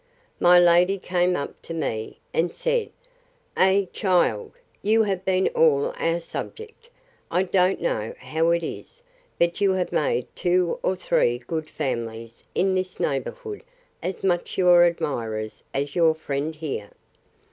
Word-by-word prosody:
My 180 0 +7
lady 175 +2 +5
came 180 -1 +1
up 140 - -5
to 165 - -7
me, 110 -8 -3 0.2
and 170 +1 0
said, - - 0 0.7
Ay, 190 +1 +3
child, 205 - +1 0.3
you 220 +2 +3
have 195 -3 -2
been 190 0 +2
all 145 -3 +3
our 165 +1 0
subject. 450 - -8 0.4
I 180 - +2
don't 185 0 +2
know - - -2
how 165 - 0
it 170 0 +2
is: 485 - -8 0.3
but 170 +2 +1
you 195 -1 +4
have 185 -1 -1
made 125 -4 0
two 180 -1 +1
or 190 - 0
three 120 -9 +1
good 155 +6 -5
families, 115 -5 -4
in 190 0 +2
this 185 -1 -2
neighbourhood, 415 - -3 0.4
as 185 - -4
much 175 -2 0
your 175 -2 +6
admirers, 115 -10 -2
as 140 +1 -3
your 165 -2 +4
friend 150 0 -3
here. 145 -10 -5
175 Hz, 145 wpm, -24 LUFS, 150-190 Hz, 0.7 s, My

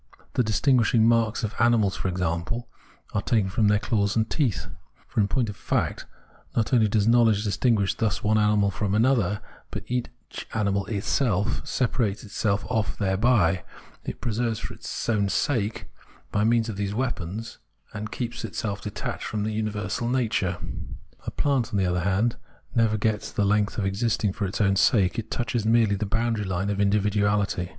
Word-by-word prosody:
The - - +2
distinguishing 115 0 +3
marks 115 -1 +2
of 110 0 -2
animals, 115 -5 +3
for - - -3
example, 90 +6 -2 0.5
are 105 - +1
taken 100 -3 +1
from 110 0 +2
their 105 0 +4
claws 100 0 0
and 110 -1 +2
teeth; 110 - 0 0.4
for, - - -3
in 100 - +4
point 120 +3 0
of 105 - -5
fact, - - -2 0.5
not 115 +2 0
only 115 -3 +5
does 105 0 +1
knowledge 115 -3 +4
distinguish 105 -1 +2
thus 105 -8 -1
one 110 +1 +3
animal 105 -1 +3
from 100 +1 -1
another; 110 -4 +2 0.3
but - - -5
each 125 0 -5
animal 100 -2 0
itself 105 0 0
separates 115 -5 0
itself 100 -1 -1
off 110 -1 -1
thereby, 95 -3 +2 0.4
it - - -6
preserves 115 -1 -1
itself - - -5
for - - -8
its - - -5
own 105 -3 +2
sake 110 -3 0 0.5
by 105 - +1
means 115 +1 +3
of 110 -3 -5
these 100 0 -2
weapons, 115 -3 -3 0.3
and 110 0 -5
keeps 120 -1 -4
itself 100 -1 -3
detached 105 - -5
from 105 -1 -2
the 110 - -1
universal 105 +1 -2
nature. 110 -8 0 0.7
A - - +1
plant, 135 -6 0
on 100 - 0
the 95 - +2
other 90 0 +1
hand, 100 +6 +1 0.4
never 110 -2 +2
gets 105 0 -1
the 105 - 0
length 105 0 +1
of 105 - 0
existing 105 0 0
for 100 -1 -2
its 95 - -4
own 100 -2 +3
sake; 100 -2 +3
it 110 0 -6
touches 120 -1 -1
merely 110 -1 +3
the 105 +1 -2
boundary 115 0 0
line 95 +2 -1
of 100 - -2
individuality. 100 -2 +1
105 Hz, 175 wpm, -25 LUFS, 100-115 Hz, 0.7 s, only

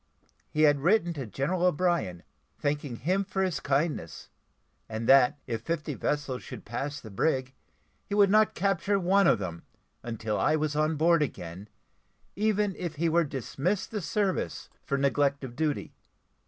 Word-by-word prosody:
He 155 - +1
had 145 -2 +5
written 175 +2 +2
to 135 -6 -5
General 140 - -2
O'Brien, 170 - +1 0.3
thanking 145 -3 -2
him 185 - 0
for 190 0 -1
his 185 -3 -1
kindness: 140 - -2 0.6
and 110 +1 -4
that, 135 0 +6
if 115 -3 -3
fifty 165 +3 -3
vessels 145 -4 -2
should 125 -4 -9
pass 140 +6 -4
the 110 - -11
brig, 130 +4 0 0.5
he 200 - -2
would 200 -2 +5
not 215 0 +4
capture 200 +1 +1
one 195 +2 +4
of - - +5
them, 85 -4 -5 0.4
until 115 -2 -3
I 155 - +3
was 155 -1 -1
on 155 +1 +1
board 165 +2 +4
again, 95 - -5 0.7
even 210 -1 +1
if 175 -3 -4
he 165 +2 +1
were 170 +1 +3
dismissed 150 - -2
the 210 -2 -3
service 195 +2 -2
for 140 - -1
neglect 140 +1 +1
of 125 -2 -7
duty. 150 0 -2
150 Hz, 160 wpm, -28 LUFS, 130-180 Hz, 0.7 s, that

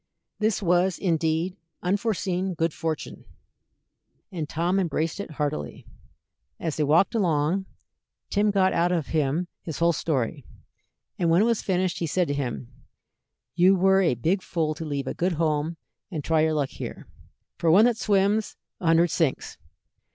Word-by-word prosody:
This 215 -1 0
was, 180 +1 +2
indeed, 165 0 0 0.3
unforeseen 190 -2 -1
good 165 -1 0
fortune, 160 -1 -4 1.1
and 160 -5 -4
Tom 175 +4 0
embraced 165 -1 -1
it 200 - -5
heartily. 145 - -4 0.7
As 160 -3 -3
they 155 - 0
walked 155 +6 +3
along, 180 -2 +1 0.6
Tim 210 +1 +2
got 190 -2 +3
out 170 +1 +2
of 170 -5 -1
him 155 +3 0
his 160 - -6
whole 170 0 +3
story; 140 -3 -2 0.8
and 170 - +2
when 170 +5 +4
it - - +3
was 230 -2 +1
finished, 185 -2 0
he 170 - -1
said 180 +3 +1
to - - 0
him: 120 - -4 0.8
"You 185 +6 +5
were 190 +1 +4
a 165 -9 +2
big 170 - 0
fool 160 -4 -1
to 160 +2 -7
leave 140 -2 -3
a - - -3
good 180 +1 0
home 155 0 -1 0.3
and 160 -6 -4
try 160 +1 +2
your 155 0 +2
luck 145 -3 0
here. - - -8 0.5
For 165 - +2
one 195 +7 +7
that 240 -2 +2
swims, 205 +1 +1 0.2
a 175 - -3
hundred 165 0 +4
sinks. 160 -6 -1
170 Hz, 160 wpm, -25 LUFS, 155-190 Hz, 1.1 s, one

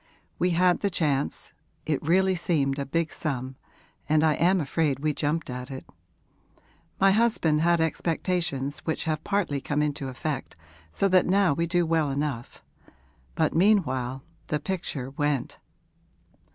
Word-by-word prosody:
We 180 - +2
had 180 0 +4
the 200 - 0
chance; 145 -6 -1 0.3
it 150 -3 -1
really 190 +4 +3
seemed 145 -6 0
a 140 - -3
big 165 +3 -1
sum, 130 -4 -3 0.5
and 155 0 +4
I 155 -1 +4
am 180 +5 +3
afraid 145 -2 0
we 155 0 +1
jumped 150 +2 -1
at 125 +1 -6
it. 130 -1 -7 1.1
My 195 0 +5
husband 195 -8 +2
had 170 0 +3
expectations 160 -3 -1
which 160 - -3
have 155 -1 -2
partly 185 -9 -1
come 145 +2 0
into 145 -2 -2
effect, 135 +2 -4 0.4
so 195 - +1
that 185 -1 +4
now 190 -3 +3
we 170 +4 -1
do 175 0 +2
well 160 -2 +1
enough. 140 -3 -4 0.7
But - - +1
meanwhile 135 - +2 0.2
the 150 - -1
picture 145 -6 -4
went.' 145 -2 -2
155 Hz, 145 wpm, -26 LUFS, 140-175 Hz, 1.1 s, My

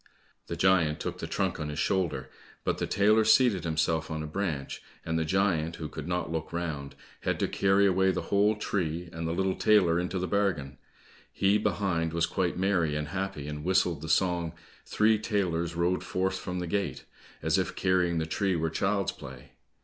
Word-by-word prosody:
The - - -3
giant 85 -5 +3
took - - -4
the - - -4
trunk 95 -3 -1
on 75 -1 -3
his 75 - -5
shoulder, 75 -7 -1 0.3
but - - -1
the - - -1
tailor 105 +3 +4
seated 110 -3 +4
himself 80 0 0
on 80 -1 -3
a - - -4
branch, 75 -4 -3 0.2
and 80 - -1
the - - +1
giant 85 -2 +1
who 80 - -5
could 75 0 -7
not 90 -1 -2
look 80 -1 -3
round, 80 -5 -4 0.2
had - - -1
to - - +1
carry 95 +1 +3
away 95 0 +3
the 95 - -1
whole 105 +2 +2
tree, 90 -5 -2
and 80 0 -4
the - - -1
little 95 +2 0
tailor 90 -6 +4
into 90 +2 -2
the 90 - -1
bargain: 90 -9 -1 0.5
he 100 +2 +2
behind, 85 -6 0
was 85 0 +2
quite 90 -3 -1
merry 90 -5 +1
and 75 0 -3
happy, 95 -5 -4
and 75 0 -5
whistled 90 -3 +2
the 80 - -6
song, 85 -1 +1 0.3
"Three 110 0 +3
tailors 85 -6 -1
rode 85 +2 +1
forth 95 +1 -1
from 90 -1 -4
the 90 - -2
gate," 100 +3 -2 0.4
as - - +2
if - - -2
carrying 90 -2 +2
the 80 - 0
tree 95 +3 0
were 80 -1 -1
child's 95 +3 0
play. 65 +1 -11
90 Hz, 195 wpm, -29 LUFS, 80-95 Hz, 0.5 s, tailor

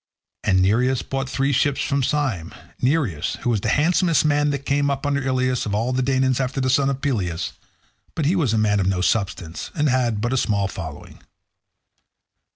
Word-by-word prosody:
And 95 -1 +3
Nireus 125 +6 +2
brought 135 0 -3
three 135 +1 0
ships 140 +1 +1
from 140 -1 0
Syme—Nireus, 125 - -1
who 120 - +1
was 110 -4 0
the 110 - -1
handsomest 165 - +2
man 145 0 +2
that 140 -1 -3
came 140 0 +1
up 140 0 -2
under 140 0 0
Ilius 130 -2 0
of 100 - -1
all 115 +4 0
the 130 - +1
Danaans 130 0 +1
after 130 +1 -2
the 130 -1 +1
son 135 +1 +3
of 135 0 -3
Peleus—but 115 - -5
he 170 +6 +2
was 150 - +1
a 110 - +1
man 105 -1 +2
of 95 - 0
no 95 -2 0
substance, 90 -4 -2
and 150 -1 +1
had 120 -4 +1
but 120 +4 -1
a - - +1
small 100 -5 +1
following. 80 -6 -8
130 Hz, 185 wpm, -22 LUFS, 105-140 Hz, -, And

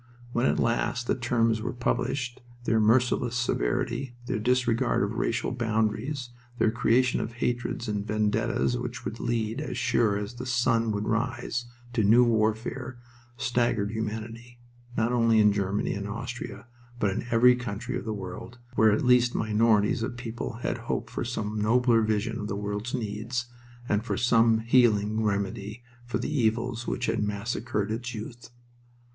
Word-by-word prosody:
When 120 +2 +1
at - - +2
last 120 +1 0
the - - +1
terms 115 -2 +1
were 120 +3 -3
published 125 +1 -1 0.2
their 115 -2 +2
merciless 120 +2 +3
severity, 120 - -1
their 110 - -1
disregard 125 0 +2
of 100 - -1
racial 115 +1 -1
boundaries, 120 +3 -1 0.3
their 110 - +3
creation 125 +2 +2
of 115 - -5
hatreds 120 0 -2
and 105 -1 -1
vendettas 110 +3 0
which 120 -1 -5
would 105 +3 -4
lead, 115 -2 -1
as - - -4
sure 120 -5 +2
as 105 +2 -4
the 125 +1 -7
sun 120 -2 +2
should 105 0 -2
rise, 120 +1 -1 0.3
to 115 -3 +2
new 115 +5 +6
warfare, 115 +3 0 0.4
staggered 120 -4 0
humanity, 110 +2 -5 0.4
not 115 +2 +2
only 115 -2 +4
in 105 -1 +5
Germany 100 0 -1
and 100 0 -4
Austria, 115 +4 -6 0.3
but 100 -4 +1
in 105 - -4
every 125 +2 +6
country 125 +1 -4
of - - -3
the 110 - -3
world, 105 +4 -7 0.2
where 110 -2 +5
at 105 - +1
least 125 -1 +4
minorities 110 +1 +2
of 120 +1 -3
people 120 0 -5
had - - -1
hoped - - -2
for - - -3
some 110 -3 -3
nobler 115 +1 +4
vision 110 +1 0
of 105 - -4
the 100 - -3
world's 105 +4 -3
needs, 115 +1 -3 0.4
and 105 +1 +1
for 120 - -2
some 115 -2 +4
healing 110 -3 +3
remedy 100 +2 -2 0.2
for 120 - -1
the 150 - -3
evils 120 -1 0
which 125 - -1
had 115 - 0
massacred 105 +1 -2
its 120 +2 -4
youth. 115 +2 -8
115 Hz, 160 wpm, -27 LUFS, 110-120 Hz, 0.4 s, new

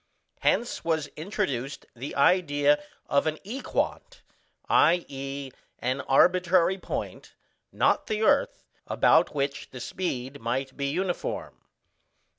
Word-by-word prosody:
Hence 240 - +1
was 160 -3 0
introduced 140 - -3
the 130 +4 -6
idea 145 -1 +3 0.2
of 140 +2 +1
an 155 0 -1
Equant, 270 - -3 0.4
i.e. 140 -5 +1 0.3
an 130 +3 -1
arbitrary 180 +5 +4
point, - - -6 0.4
not - - +2
the 215 0 -1
earth, - - +2 0.2
about - - +3
which 140 -1 -2
the 130 - -9
speed 135 -2 -4
might 130 +3 -2
be 140 -1 -2
uniform. 175 +5 -3
145 Hz, 105 wpm, -27 LUFS, 135-180 Hz, 0.4 s, arbitrary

